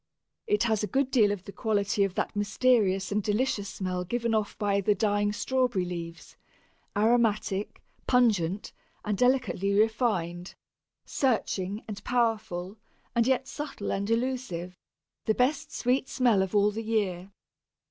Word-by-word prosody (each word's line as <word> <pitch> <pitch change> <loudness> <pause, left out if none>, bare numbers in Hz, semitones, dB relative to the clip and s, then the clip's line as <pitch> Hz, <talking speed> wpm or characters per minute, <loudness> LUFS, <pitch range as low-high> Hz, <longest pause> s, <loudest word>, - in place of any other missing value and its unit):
It 420 -1 +2
has 220 -3 +1
a 210 - -1
good 265 +2 0
deal 215 -6 +4
of 200 -3 -4
the 200 - -9
quality 205 -1 0
of 195 -2 -1
that - - -2
mysterious 205 -2 +2
and 210 +1 +1
delicious 210 0 0
smell 185 -1 -3
given 235 +4 -1
off 215 -2 -1
by 200 -1 +1
the 205 +2 +2
dying 205 0 +1
strawberry 245 -4 0
leaves, 170 -1 -7 0.6
aromatic, 215 -3 +1 0.2
pungent, 210 -7 +2 0.3
and 210 -1 0
delicately 230 -5 +1
refined, 205 -6 0 0.5
searching 210 -6 -1
and 200 -2 -7
powerful, 215 -5 -1 0.3
and 235 0 +2
yet 260 0 +1
subtle 285 -7 -5
and 200 +1 -2
elusive 230 -7 -2 0.5
the 220 - +2
best 255 +5 +1
sweet 260 +2 0
smell 240 -7 +3
of 190 +2 -2
all 205 0 +4
the 220 +2 -4
year. 200 -5 -1
210 Hz, 140 wpm, -28 LUFS, 195-240 Hz, 0.6 s, deal